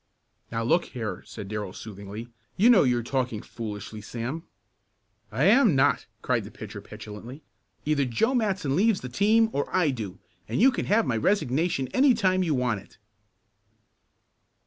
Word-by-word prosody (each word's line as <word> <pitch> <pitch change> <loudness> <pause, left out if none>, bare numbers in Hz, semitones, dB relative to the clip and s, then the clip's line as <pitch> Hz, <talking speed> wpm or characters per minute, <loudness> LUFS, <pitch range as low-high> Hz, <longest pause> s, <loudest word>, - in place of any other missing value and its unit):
"Now, 115 0 -1
look 170 +9 +2
here," 115 -4 -5
said 105 -3 -8
Darrell 105 -2 -4
soothingly, 105 +1 -8 0.3
"you 230 +6 +6
know 220 - +7
you're 125 -3 +2
talking 125 -3 -2
foolishly, 105 -1 -7
Sam." 120 +9 -5 0.9
"I 120 +6 0
am 215 - +5
not!" 135 -2 +2 0.2
cried - - +1
the - - -9
pitcher - - -9
petulantly. 115 +8 -10 0.4
"Either 145 -2 +2
Joe 130 - +1
Matson 195 - 0
leaves 210 +1 +3
the 125 - -6
team 220 - +3
or 140 - -1
I 175 -6 +2
do, 105 -7 -6 0.3
and - - -2
you 260 +5 +6
can - - -3
have 215 +3 +3
my 115 - 0
resignation 155 - +1
any 265 -1 +4
time 185 -4 +2
you 165 -5 +1
want 125 -5 0
it!" - - -21
135 Hz, 160 wpm, -26 LUFS, 115-190 Hz, 0.9 s, know